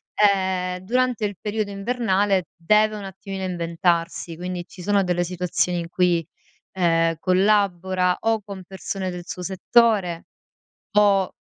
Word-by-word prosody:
Ehm, 190 Hz, -3 st, +2 dB
durante 240 Hz, +3 st, 0 dB
il 205 Hz, -1 st, -3 dB
periodo 210 Hz, 0 st, -2 dB
invernale 200 Hz, -3 st, 0 dB
deve 210 Hz, +5 st, +3 dB
un 205 Hz, -, -7 dB
attimino 195 Hz, 0 st, -7 dB
inventarsi, 170 Hz, -1 st, -1 dB
quindi 180 Hz, 0 st, -5 dB
ci 180 Hz, -, -13 dB
sono 200 Hz, +2 st, +2 dB
delle 175 Hz, -1 st, 0 dB
situazioni 180 Hz, 0 st, -1 dB
in 170 Hz, 0 st, -5 dB
cui, 175 Hz, -2 st, +1 dB, 0.5 s
ehm, 165 Hz, -2 st, +2 dB
collabora 185 Hz, -1 st, +2 dB
o 225 Hz, -1 st, +1 dB
con 195 Hz, -2 st, -8 dB
persone 190 Hz, +1 st, -4 dB
del 180 Hz, -1 st, -6 dB
suo 180 Hz, -, -6 dB
settore 190 Hz, -2 st, +2 dB, 0.7 s
o 200 Hz, -2 st, +4 dB
185 Hz, 130 wpm, -23 LUFS, 175-205 Hz, 0.7 s, o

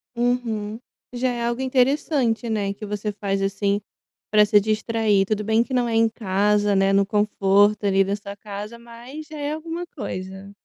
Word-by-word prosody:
Uhum. 235 Hz, -3 st, -1 dB, 0.4 s
Já 250 Hz, +1 st, 0 dB
é 240 Hz, -1 st, -2 dB
algo 235 Hz, +2 st, -1 dB
interessante, 260 Hz, -2 st, +1 dB
né, 205 Hz, -3 st, -1 dB
que 210 Hz, +2 st, -8 dB
você 210 Hz, +1 st, -3 dB
faz 195 Hz, -1 st, -2 dB
assim 200 Hz, +1 st, 0 dB, 0.5 s
pra 210 Hz, 0 st, +5 dB
se 210 Hz, 0 st, +5 dB
distrair. 215 Hz, -1 st, +1 dB
Tudo 210 Hz, +1 st, -1 dB
bem 220 Hz, +2 st, +3 dB
que 260 Hz, -, -8 dB
não 245 Hz, -1 st, +2 dB
é 230 Hz, -, -1 dB
em 225 Hz, 0 st, +4 dB
casa, 205 Hz, -1 st, +1 dB
né, 195 Hz, 0 st, +3 dB
no 200 Hz, 0 st, +4 dB
conforto 205 Hz, 0 st, +2 dB
ali 195 Hz, -1 st, +4 dB
da 195 Hz, +1 st, -1 dB
sua 200 Hz, -1 st, -8 dB
casa, 205 Hz, +2 st, -8 dB
mas 240 Hz, +6 st, -11 dB
é 295 Hz, -1 st, -3 dB
alguma 330 Hz, +2 st, -5 dB
coisa. 190 Hz, -, -7 dB
215 Hz, 175 wpm, -23 LUFS, 200-240 Hz, 0.5 s, pra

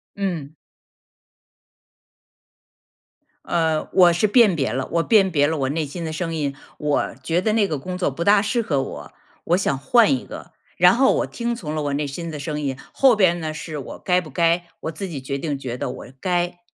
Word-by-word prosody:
嗯。 175 Hz, -8 st, -3 dB, 2.9 s
嗯， 160 Hz, -2 st, 0 dB
我 180 Hz, -2 st, +7 dB
是 175 Hz, +5 st, +2 dB
辨 210 Hz, -4 st, +5 dB
别 135 Hz, -8 st, -1 dB
了， 130 Hz, +1 st, -2 dB
我 170 Hz, 0 st, +1 dB
辨 195 Hz, -3 st, +4 dB
别 145 Hz, -3 st, +3 dB
了 160 Hz, +1 st, -1 dB
我 135 Hz, -2 st, -1 dB
内 155 Hz, +2 st, -1 dB
心 155 Hz, +5 st, -7 dB
的 160 Hz, -, -3 dB
声 165 Hz, +1 st, -3 dB
音。 145 Hz, -3 st, -1 dB, 0.2 s
我 150 Hz, -5 st, -1 dB
觉 165 Hz, +6 st, +1 dB
得 215 Hz, +3 st, +1 dB
那 215 Hz, -2 st, +3 dB
个 155 Hz, -, -2 dB
工 180 Hz, +7 st, -5 dB
作 180 Hz, -5 st, 0 dB
不 165 Hz, +6 st, -4 dB
大 200 Hz, +2 st, +5 dB
适 215 Hz, +3 st, 0 dB
合 145 Hz, -11 st, 0 dB
我， 75 Hz, -, -8 dB, 0.3 s
我 175 Hz, -, +3 dB
想 140 Hz, -8 st, 0 dB
换 225 Hz, -, +4 dB
一 260 Hz, -, -2 dB
个， -, -, -10 dB, 0.2 s
然 -, -, +6 dB
后 265 Hz, +2 st, +4 dB
我 -, -, 0 dB
听 235 Hz, 0 st, -3 dB
从 155 Hz, -9 st, -6 dB
了 155 Hz, -1 st, -2 dB
我 145 Hz, -1 st, -2 dB
内 145 Hz, +1 st, -1 dB
心 165 Hz, +5 st, -6 dB
的 155 Hz, -2 st, -6 dB
声 150 Hz, +1 st, -4 dB
音， 135 Hz, -3 st, -2 dB, 0.2 s
后 265 Hz, -4 st, +5 dB
边 180 Hz, -4 st, +3 dB
呢 155 Hz, -2 st, -4 dB
是 155 Hz, 0 st, -6 dB
我 135 Hz, -, -8 dB
该 180 Hz, -1 st, +2 dB
不 170 Hz, -4 st, -8 dB
该？ 170 Hz, +4 st, +1 dB, 0.2 s
我 160 Hz, -, -3 dB
自 195 Hz, +5 st, -6 dB
己 150 Hz, -7 st, -6 dB
决 140 Hz, +1 st, -3 dB
定 145 Hz, 0 st, -3 dB
觉 125 Hz, -3 st, -5 dB
得 -, -, -3 dB
我 -, -, -8 dB
该。 175 Hz, 0 st, -1 dB
165 Hz, 225 characters per minute, -22 LUFS, 145-185 Hz, 2.9 s, 我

